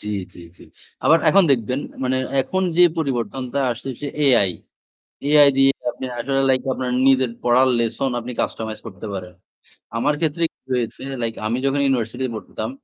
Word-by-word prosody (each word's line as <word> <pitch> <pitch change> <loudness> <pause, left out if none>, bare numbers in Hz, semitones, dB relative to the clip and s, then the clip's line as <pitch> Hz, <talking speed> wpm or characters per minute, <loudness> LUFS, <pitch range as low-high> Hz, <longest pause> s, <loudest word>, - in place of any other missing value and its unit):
জ্বি, 105 - -7 0.2
জ্বি, - - -13 0.2
জি। - - -14 0.4
আবার 165 - +6
এখন 195 +5 +6
দেখবেন 125 +1 +1 0.2
মানে 130 +1 +1 0.2
এখন 185 +9 -1
যে 180 - +6 0.2
পরিবর্তনটা 130 -2 -2
আসতেছে 130 +3 -7 0.2
AI। 120 -9 +4 0.8
AI 145 -1 +7
দিয়ে 135 0 +6 0.2
আপনে 130 - -7
আসলে 135 +3 0
লাইক 130 -1 +3
আপনার 130 -1 -3 0.2
নিজের 130 -2 +3
পড়ার 125 +2 +4
লেসন 120 +3 -1
আপনি 120 +1 -6
কাস্টমাইজ 110 -1 -4
করতে 95 0 -9
পারেন। 90 -2 -6 0.6
আমার 145 +6 +1
ক্ষেত্রে 160 0 -1
কি - - -75 0.2
হয়েছে 120 -2 -3 0.2
লাইক 115 -1 -1
আমি 115 +3 0
যখন 140 +1 +1
ইউনিভার্সিটি 130 -1 -1
তে - - -5
পড়তাম, 110 - -6
130 Hz, 165 wpm, -21 LUFS, 115-135 Hz, 0.8 s, AI